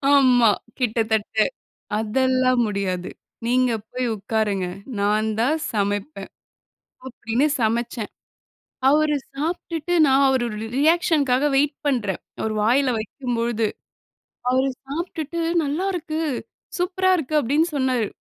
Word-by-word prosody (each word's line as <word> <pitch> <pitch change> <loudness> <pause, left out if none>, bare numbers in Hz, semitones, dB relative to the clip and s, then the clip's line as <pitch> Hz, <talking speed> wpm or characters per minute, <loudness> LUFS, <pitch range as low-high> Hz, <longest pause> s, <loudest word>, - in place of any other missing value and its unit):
ஆமா, 250 -5 +5 0.3
கிட்டத்தட்ட. 220 -3 0 0.6
அதெல்லாம் 255 +2 +2
முடியாது. 190 -3 -2 0.4
நீங்க 250 0 +2 0.2
போய் 255 0 -2
உட்காருங்க. 205 -2 -1 0.3
நான் 210 +2 +2
தான் 275 +7 +2 0.2
சமைப்பேன், 205 +7 -2 0.8
அப்டின்னு 245 +2 0 0.2
சமைச்சேன். 230 0 -1 0.8
அவுரு 300 +1 +3 0.2
சாப்ட்டுட்டு 330 +2 -3
நான் 275 +1 +4
அவரு 260 -2 +2
ஒரு 210 - -6 0.2
ரியாக்ஷன்க்காக 295 -3 +3
வெயிட் 285 +1 +2
பண்றன். 215 -9 0 0.2
அவர் 220 0 -1
வாயில 255 +3 +3
வைக்கும் 245 +3 -4
பொழுது. 230 -2 0 0.8
அவர் 260 +1 +2 0.2
சாப்ட்டுட்டு 330 +2 -4 0.2
நல்லா 305 +7 -1
இருக்கு, 320 -2 -3 0.6
சூப்பரா 375 +1 +1
இருக்கு 310 -1 -3
அப்டின்னு 300 +7 +1
சொன்னாரு 255 -5 +1
255 Hz, 105 wpm, -23 LUFS, 220-295 Hz, 0.8 s, ஆமா